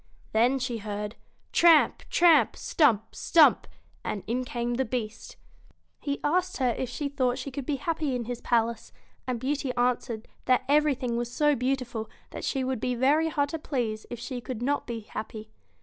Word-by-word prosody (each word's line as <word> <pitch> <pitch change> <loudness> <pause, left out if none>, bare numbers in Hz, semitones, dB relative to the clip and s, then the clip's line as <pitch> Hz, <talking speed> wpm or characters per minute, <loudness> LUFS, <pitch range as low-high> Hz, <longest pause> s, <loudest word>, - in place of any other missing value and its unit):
Then 240 +5 +3
she 245 -3 -3
heard, 210 +1 -5 0.4
tramp, 335 -2 +5
tramp! 340 -2 +5
stump, 225 -9 +2
stump! 325 -3 +4 0.4
and 200 - -3
in 245 +3 -1
came 240 -1 -2
the 260 +2 +1
Beast 225 -2 -5 0.6
He 285 -1 -3
asked 360 +4 +1
her 255 -2 +2
if 250 +1 -3
she 285 +4 -3
thought 255 -3 0
she 275 +1 -5
could 265 0 -6
be 295 - +1
happy 305 -1 -1
in 240 -2 -3
his 245 0 -5
palace; 230 -1 0 0.4
and 250 -2 -1
Beauty 275 +1 -1
answered, 240 -2 -1 0.2
that 255 -1 +3
everything 275 -5 +2
was 240 0 -3
so 295 +3 +3
beautiful 250 -3 -2 0.2
that - - -7
she 270 -2 -1
would 260 -2 -1
be 250 +2 -1
very 295 +6 +3
hard 285 -2 0
to 325 - -4
please 235 -8 -3
if 240 - -5
she 245 0 -5
could 240 -1 -5
not 285 +3 0
be 235 -2 -4
happy. 215 0 -7
250 Hz, 180 wpm, -27 LUFS, 235-285 Hz, 0.6 s, tramp